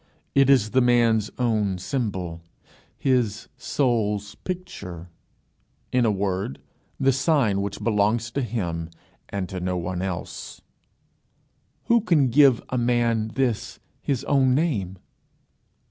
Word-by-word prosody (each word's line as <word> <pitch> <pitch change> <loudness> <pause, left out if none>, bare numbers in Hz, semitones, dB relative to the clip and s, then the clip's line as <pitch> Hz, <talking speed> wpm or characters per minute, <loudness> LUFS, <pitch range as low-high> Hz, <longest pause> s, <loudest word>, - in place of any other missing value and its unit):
It 135 -1 +4
is 120 -6 +4
the 130 - +4
man's 115 -3 +3
own 110 -6 +1
symbol, 90 - -3 0.6
his 120 -6 0
soul's 110 -6 0
picture, 100 - -7 0.8
in 125 -1 +3
a 110 - +3
word, 95 -6 -2 0.4
the 135 0 +4
sign 130 -7 +2
which 100 +1 -4
belongs 110 +1 +1
to 140 - -1
him 85 -9 -3 0.4
and 100 -2 -3
to 95 - -5
no 90 0 -1
one 90 +1 -3
else. 95 -3 -5 1.2
Who 235 0 +3
can 160 - +3
give 135 -1 +5
a 125 - 0
man 120 -2 +1
this, 125 -5 -1 0.2
his 135 -4 -1
own 130 -3 +3
name? 110 - -1
115 Hz, 120 wpm, -24 LUFS, 100-130 Hz, 1.2 s, give